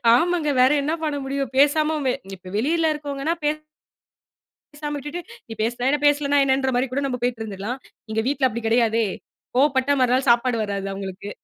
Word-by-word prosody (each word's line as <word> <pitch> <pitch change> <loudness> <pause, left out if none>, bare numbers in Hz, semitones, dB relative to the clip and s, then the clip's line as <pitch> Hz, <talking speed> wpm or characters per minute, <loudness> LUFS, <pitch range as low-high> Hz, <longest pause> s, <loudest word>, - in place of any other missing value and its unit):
ஆமாங்க. 330 0 +1
வேற 260 +2 +6
என்ன 310 +3 0
பண்ண 290 -1 -1
முடியும்? 275 -1 -2
பேசாம 305 +2 +3
வெ 250 - +2 0.2
இப்ப 185 0 -12
வெளியில 320 +6 +2
இருக்கறவங்கனா, 290 +1 -3
பே 295 - +4 1.2
பேசாம 295 0 -5
விட்டுட்டு, 295 +5 -5 0.3
நீ 225 - -9
பேசுனா 245 +2 -1
என்ன? 295 0 +1
பேசலைன்னா 285 0 +3
என்னன்ற 265 0 +2
மாரி 255 +2 +2
கூட 280 +2 0
நாம 250 -2 -2
போயிட்டு 245 -2 -1
இருந்துறலாம். 215 +5 -5 0.3
இங்க 220 - +1
வீட்டுல 275 -2 +2
அப்படி 235 0 -5
கிடையாதே. 230 -1 +3 0.5
கோபப்பட்ட 270 0 +3
மறுநாள் 255 +1 +2
சாப்பாடு 235 0 +3
வராது 200 -1 -3
அவங்களுக்கு. 195 +1 -6
265 Hz, 170 wpm, -23 LUFS, 235-290 Hz, 1.2 s, வேற